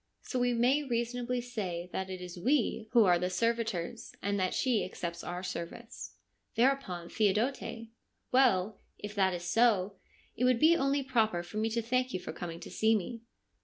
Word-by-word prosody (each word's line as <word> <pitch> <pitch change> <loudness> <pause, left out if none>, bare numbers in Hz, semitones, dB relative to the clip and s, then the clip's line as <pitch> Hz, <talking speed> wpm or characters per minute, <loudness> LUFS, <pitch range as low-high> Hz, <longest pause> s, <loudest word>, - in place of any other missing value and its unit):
So 255 - -2
we 245 0 +2
may 245 +5 +3
reasonably 245 0 -1
say 190 -8 -4
that 190 0 -3
it 185 -1 -6
is 180 0 -8
we 240 -1 +1
who 235 -4 +6
are 175 -2 +4
the 180 +1 0
servitors, 225 -2 -1
and 200 0 -1
that 185 -1 0
she 250 -4 +2
accepts 170 -2 -5
our 180 +1 -5
service.' 180 +6 -6 0.4
Thereupon 235 -9 +1
Theodote: 220 +7 +1 0.5
' - - -49
Well, 215 -6 +3 0.2
if 205 0 -7
that 190 -3 +2
is 175 - -6
so, 210 -4 +3 0.4
it 240 - -2
would 250 -2 +4
be 325 +4 +6
only 275 -2 +1
proper 220 -9 +1
for 190 +5 -8
me 220 +1 +1
to 230 +1 -1
thank 255 +1 0
you - - -1
for 180 - -7
coming 170 0 -6
to - - -9
see 220 +1 +3
me.' 225 +3 -3
220 Hz, 185 wpm, -31 LUFS, 185-245 Hz, 0.5 s, who